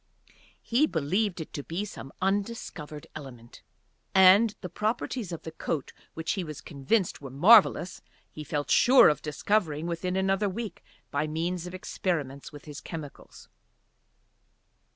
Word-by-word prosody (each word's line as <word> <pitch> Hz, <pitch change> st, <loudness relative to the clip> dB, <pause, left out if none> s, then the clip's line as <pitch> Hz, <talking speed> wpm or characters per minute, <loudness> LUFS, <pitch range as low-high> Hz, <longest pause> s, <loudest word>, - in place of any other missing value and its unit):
He 260 Hz, +7 st, +3 dB
believed 180 Hz, -, 0 dB
it 160 Hz, -, -9 dB
to 145 Hz, -, -4 dB
be 175 Hz, +8 st, -3 dB
some 135 Hz, -8 st, -9 dB
undiscovered 195 Hz, -7 st, -3 dB
element. 125 Hz, -6 st, -11 dB, 0.5 s
And 195 Hz, +4 st, +7 dB
the 180 Hz, -, -4 dB
properties 215 Hz, +2 st, -2 dB
of 170 Hz, -, -6 dB
the 160 Hz, -, -6 dB
coat 160 Hz, -2 st, -4 dB, 0.2 s
which 160 Hz, 0 st, -2 dB
he 190 Hz, -, -2 dB
was 155 Hz, -3 st, -7 dB
convinced 165 Hz, +7 st, -1 dB
were 135 Hz, -, -7 dB
marvellous 180 Hz, -, +5 dB, 0.3 s
he 155 Hz, -, -8 dB
felt 145 Hz, -1 st, -3 dB
sure 260 Hz, +1 st, +7 dB
of 150 Hz, -, -1 dB
discovering 155 Hz, 0 st, 0 dB
within 175 Hz, +2 st, -2 dB
another 195 Hz, +2 st, +1 dB
week 210 Hz, -1 st, -6 dB, 0.3 s
by 145 Hz, +2 st, 0 dB
means 170 Hz, +3 st, -2 dB
of 180 Hz, -, -7 dB
experiments 150 Hz, -7 st, -3 dB
with 145 Hz, -2 st, -12 dB
his 150 Hz, -1 st, -8 dB
chemicals. 155 Hz, -4 st, -9 dB
170 Hz, 140 wpm, -28 LUFS, 150-200 Hz, 0.5 s, And